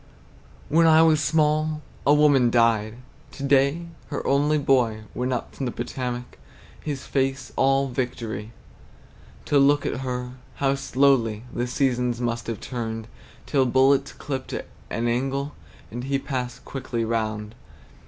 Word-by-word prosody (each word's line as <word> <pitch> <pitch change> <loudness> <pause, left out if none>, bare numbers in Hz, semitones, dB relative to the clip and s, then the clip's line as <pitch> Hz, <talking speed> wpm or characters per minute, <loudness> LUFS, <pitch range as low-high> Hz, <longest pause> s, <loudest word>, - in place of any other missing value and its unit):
When 165 +2 +4
I 160 0 +7
was 155 -2 +4
small, 155 0 +1 0.2
a 145 - +7
woman 145 -5 +5
died. 115 -2 +2 0.4
To 140 - -7
day 140 +4 +3 0.2
her 145 - -4
only 145 +2 +3
boy 125 -6 +2
Went 125 +1 -2
up 125 - -3
from 135 - -3
the - - -2
Potomac, 125 0 -5 0.4
His 145 -3 -4
face 135 -1 -1
all 135 +1 +3
victory, 115 -4 -4 0.9
To 145 - +3
look 145 +1 +4
at - - -1
her; 125 -1 -3 0.2
how 135 -1 +1
slowly 135 -5 +2
The 120 - -1
seasons 125 -2 0
must 120 -1 -2
have 115 -3 -3
turned 115 -2 -5 0.4
Till 135 -3 +2
bullets 135 +2 +3
clipt 135 -2 -4 0.3
an 115 +1 -1
angle, 135 +4 -1 0.4
And 120 +3 -5
he 135 0 +1
passed 125 -3 -4
quickly 125 -4 -3
round! 110 -1 -2
130 Hz, 140 wpm, -24 LUFS, 120-140 Hz, 0.9 s, I